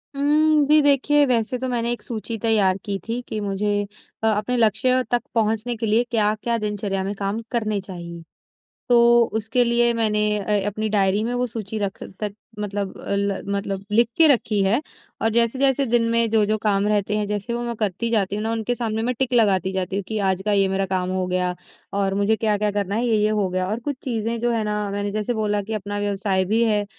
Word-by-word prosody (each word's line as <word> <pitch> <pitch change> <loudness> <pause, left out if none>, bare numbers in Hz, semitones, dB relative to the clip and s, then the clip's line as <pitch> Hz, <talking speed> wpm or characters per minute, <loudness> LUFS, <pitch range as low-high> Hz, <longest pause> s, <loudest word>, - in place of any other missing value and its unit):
हुँ। 300 +1 +3
जी 305 0 +6
देखिए, 290 +1 +3
वैसे 245 -1 0
तो 260 +1 -3
मैंने 235 -1 -1
एक 240 - -4
सूची 225 0 -4
तैयार 200 -4 +3
की 200 -1 -2
थी 235 +2 -2
कि 215 - -4
मुझे 205 +1 -1 0.4
अ, - - +3
अपने 215 +3 0
लक्ष्य 240 +3 +3
तक 245 - +2
पहुँचने 225 +2 0
के 225 0 -3
लिए 220 +3 +3
क्या-क्या 215 +1 +1
दिनचर्या 205 -3 -2
में 195 - -3
काम 200 +3 -2
करने 215 -4 0
चाहिए। 170 -3 -8 0.7
तो 245 - +5 0.4
उसके 225 +3 +1
लिए 235 0 +3
मैंने 215 -2 +1 0.2
अ, 205 -1 0
अपनी 215 +2 -2
डायरी 200 -1 +2
में 240 - -2
वो 250 0 0
सूची 220 -2 -5
रख 200 -1 -4 0.2
तक 205 -1 -3 0.2
मतलब 205 -1 -3 0.2
ल 200 0 0
मतलब 200 -1 -3
लिख 235 +1 +4
के 325 - +6
रखी 220 -5 0
है 225 +8 +2 0.4
और 225 - +2
जैसे-जैसे 265 +4 +2
दिन 235 0 +2
में 230 0 +2
जो-जो 215 -1 +2
काम 205 -1 +2
रहते 210 0 0
हैं 210 - -1
जैसे 210 +3 -3
वो 240 - -3
मैं 235 -1 -3
करती 215 +2 -2
जाती 205 -3 0
हूँ 210 - -3
ना, 225 - -1
उनके 230 +2 -1
सामने 225 -2 -2
मैं 250 +2 0
टिक 265 -1 0
लगाती 190 -5 +3
जाती 190 0 -2
हूँ 200 - -1
कि 220 -1 -2
आज 190 0 0
का 210 - +2
ये 195 -1 +3
मेरा 195 0 0
काम 185 -1 -1
हो 185 -1 -1
गया 180 0 0 0.4
और 195 -1 0
मुझे 205 +2 +2
क्या-क्या 210 -1 +1
करना 200 -1 -2
है। 235 +3 0
ये-ये 215 -2 +2
हो 190 - +1
गया 185 0 -1
और 220 +3 -2
कुछ 285 +3 -4
चीज़ें 230 -2 -2
जो 240 - +1
है 225 -2 0
ना 210 -1 -2
मैंने 205 0 -2
जैसे 215 +3 -2
बोला 210 -1 0
कि 220 +3 -7
अपना 205 0 -4
व्यवसाय 200 -2 0
भी 220 +5 +1
है 210 -2 +1
215 Hz, 215 wpm, -22 LUFS, 200-235 Hz, 0.7 s, जी